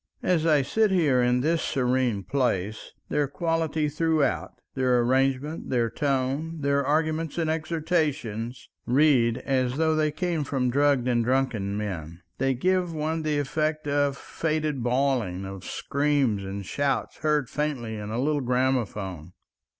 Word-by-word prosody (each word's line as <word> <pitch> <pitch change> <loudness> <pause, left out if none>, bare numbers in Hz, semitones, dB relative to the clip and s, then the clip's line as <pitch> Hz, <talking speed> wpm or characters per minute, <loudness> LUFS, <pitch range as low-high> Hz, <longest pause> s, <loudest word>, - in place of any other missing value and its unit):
As 165 -3 +2
I 150 -3 +4
sit 220 +10 +2
here 155 -9 +3
in 125 +1 +2
this 160 +4 +1
serene 125 -5 0
place, 110 -3 -1 0.2
their 145 -1 +1
quality 160 0 -1
throughout, 155 -2 0 0.2
their 130 -2 +2
arrangement, 135 +5 0
their 120 -3 +1
tone, 140 +3 -1
their 140 0 +2
arguments 155 +2 0
and 160 -2 +1
exhortations, 155 - -2 0.2
read 125 -3 +4
as 130 -1 0
though 160 0 +2
they 155 -1 +1
came 165 0 -1
from 130 -3 0
drugged 140 -2 +2
and 120 -2 +2
drunken 115 -6 0
men. 90 -5 -5 0.2
They 135 0 +1
give 180 +5 +1
one 160 +1 -1
the 155 -1 0
effect 155 +2 -1
of 145 -1 +1
faded 155 -4 -2
bawling, 120 -7 0
of 95 -1 -8
screams 140 -8 0
and 95 +1 -5
shouts 140 +7 -1
heard 150 -3 +1
faintly 135 -7 -3
in 105 -1 -6
a 115 +2 -2
little 145 +2 +1
gramophone. 110 - -1
135 Hz, 140 wpm, -26 LUFS, 120-155 Hz, 0.2 s, I